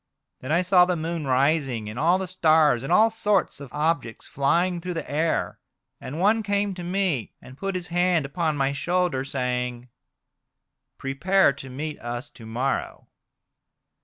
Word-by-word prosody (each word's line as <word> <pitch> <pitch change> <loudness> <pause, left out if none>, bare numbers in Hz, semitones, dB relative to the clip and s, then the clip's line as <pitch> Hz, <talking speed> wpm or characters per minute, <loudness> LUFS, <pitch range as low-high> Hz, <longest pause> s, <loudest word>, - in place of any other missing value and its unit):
Then 130 - -6
I 170 +3 +3
saw 180 0 +5
the 180 0 0
moon 165 -2 -3
rising 135 -4 +1
and 110 +3 -6
all 170 +4 +4
the 190 - -3
stars, 155 -7 +3
and 135 - -5
all 225 +1 +5
sorts 210 -3 0
of 140 -3 -10
objects 150 -7 -2
flying 170 +6 +1
through 180 0 -4
the 165 - -4
air. 160 +3 -1 0.4
And 145 +5 -6
one 215 +4 +3
came 205 -1 0
to 180 -1 -7
me, 175 - -1
and 130 - -13
put 195 +5 -4
his 180 -1 -5
hand 175 -3 +2
upon 155 +1 -1
my 135 0 +1
shoulder, 175 -2 0
saying: 125 -2 -3 0.5
' - - -58 0.3
Prepare 140 +6 +2
to 135 0 -10
meet 150 +4 -5
us 120 +3 -5
to 115 - -13
morrow.' 125 +5 -3
155 Hz, 165 wpm, -25 LUFS, 135-180 Hz, 0.5 s, saw